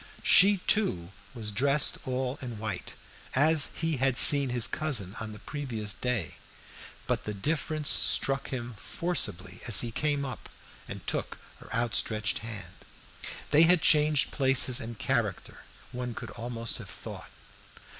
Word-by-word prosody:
She, 200 +2 +5
too, 90 - +1 0.3
was 110 -3 -5
dressed 140 +6 +1
all 130 +1 -4
in 120 -4 -7
white, 105 -4 -7 0.4
as 150 +2 +4
he 165 -2 -3
had 130 -1 0
seen 140 -2 +9
his 120 -2 +2
cousin 115 - -1
on 110 -1 -7
the 105 - -11
previous 115 -6 -6
day; 115 -4 -4 0.7
but - - -3
the 105 - -5
difference 155 +5 -1
struck 135 0 +1
him 120 -2 -6
forcibly 105 - -3
as 115 - +7
he 120 - -4
came 145 +2 -2
up 130 -4 -9 0.4
and - - -9
took - - -4 0.2
her - - -16
outstretched 110 -2 -1
hand. 105 -6 -9 0.8
They 150 +2 +5
had 165 0 +4
changed 150 -1 +3
places 130 -2 +4
and 115 0 -8
character, - - -3 0.3
one 125 -1 -6
could - - -9
almost 115 -1 -3
have - - -11
thought. - - -11
125 Hz, 145 wpm, -27 LUFS, 110-145 Hz, 0.8 s, seen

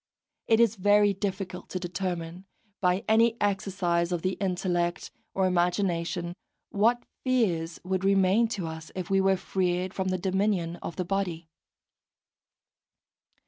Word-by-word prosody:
It 225 -1 +4
is 230 -2 +4
very 205 +1 +4
difficult 190 -2 -4
to 185 - -3
determine, 175 0 -4 0.3
by 180 +1 +1
any 230 +1 +4
exercise 185 -4 0
of 175 -2 -2
the 185 - +1
intellect 180 -2 -1 0.2
or 190 - +2
imagination, 175 -1 0 0.4
what 230 +4 +2 0.2
fears 185 -11 0
would 185 +1 -1
remain 195 +3 +4
to 205 -6 -4
us 160 -1 -7
if 185 0 -4
we 195 0 +4
were 190 0 +3
freed 185 0 -1
from 190 -1 -2
the 185 0 0
dominion 185 -2 0
of 170 - -7
the 180 - -2
body. 175 -4 -2
185 Hz, 135 wpm, -28 LUFS, 175-200 Hz, 0.4 s, It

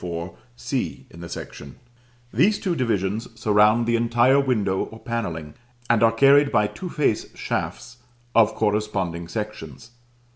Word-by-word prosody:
4, 85 0 -5 0.2
c - - -4
in 85 - -13
the 85 - -8
section; 70 - -8 0.6
these 185 - +3
two 185 -4 -2
divisions 110 - -1
surround 105 +2 +4
the 120 0 +1
entire 120 +3 +3
window 105 -8 0
or 110 - -12
panelling, 80 -12 -4 0.4
and 115 -2 +3
are 115 -1 +5
carried 140 +4 +5
by 105 -4 +3
two 180 - -6
face 145 -9 0
shafts 120 - -4 0.4
of 110 -1 +4
corresponding 100 -6 -1
sections. 105 - -7
110 Hz, 140 wpm, -23 LUFS, 95-120 Hz, 0.6 s, are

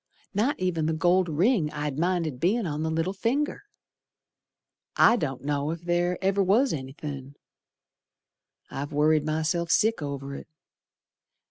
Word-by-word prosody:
Not 220 +8 0
ev'n 170 -4 0
the 160 - +1
gold 175 +2 +2
ring 170 - +2
I'd 150 -1 -3
minded 170 -6 0
bein' 205 - +1
on 150 -2 -3
the 160 - -1
little 165 +4 -1
finger. 265 - -1 1.3
I 230 - +6
don't 135 - -3
know 145 0 -1
ef 165 +1 -4
ther 175 +1 0
ever 195 +1 +2
was 220 +8 +3
anythin'. 140 -1 -7 1.4
I've 140 +2 -5
worried 150 +1 +3
myself 160 +2 -1
sick 215 +3 +2
over 140 -1 -5
it. - - -8
160 Hz, 135 wpm, -26 LUFS, 150-185 Hz, 1.4 s, I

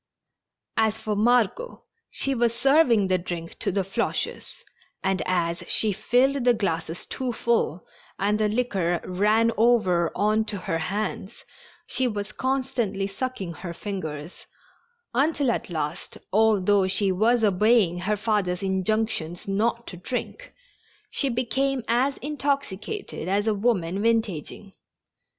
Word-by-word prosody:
As 220 -1 +2
for 215 -1 -3
Margot, 245 - +1 0.3
she 275 - 0
was 235 -2 +1
serv 275 +5 +4
ing 215 -4 +4
the 185 -1 +2
drink 170 -1 -6
to - - -1
the 195 +1 0
Floches, 195 - -3 0.4
and, 190 -1 +1
as 175 -1 0
she 215 - +3
filled 260 +6 +2
the 245 -1 +4
glasses 165 -4 -2
too 255 -2 -3
full 225 -8 0 0.3
and 210 +2 +1
the 215 -1 +2
liquor 195 -7 0
ran 210 +5 +2
over 205 -8 +3
on 215 +1 +2
to 210 -1 -3
her 165 -3 -2
hands, 205 +3 -4 0.4
she 260 - 0
was 210 -2 -4
constantly 255 -6 -1
sucking 200 -3 -4
her 170 +2 -7
fingers, 165 -6 -6 0.7
until 280 0 +2
at - - -3
last, 155 0 -4 0.2
although 205 -2 +4
she 195 +1 +1
was 225 +5 +2
obeying 205 -2 +3
her 210 +4 0
father's 200 -4 0
injunctions 190 -3 -1
not 230 +4 0
to 180 - -8
drink, 255 - -5 0.6
she 275 - +1
became 255 +2 0
as 255 +4 +2
intoxicated 285 - -3
as 200 +2 +1
a 220 - +2
woman 200 -4 0
vintaging. 210 -4 -1
210 Hz, 130 wpm, -25 LUFS, 185-240 Hz, 0.7 s, serv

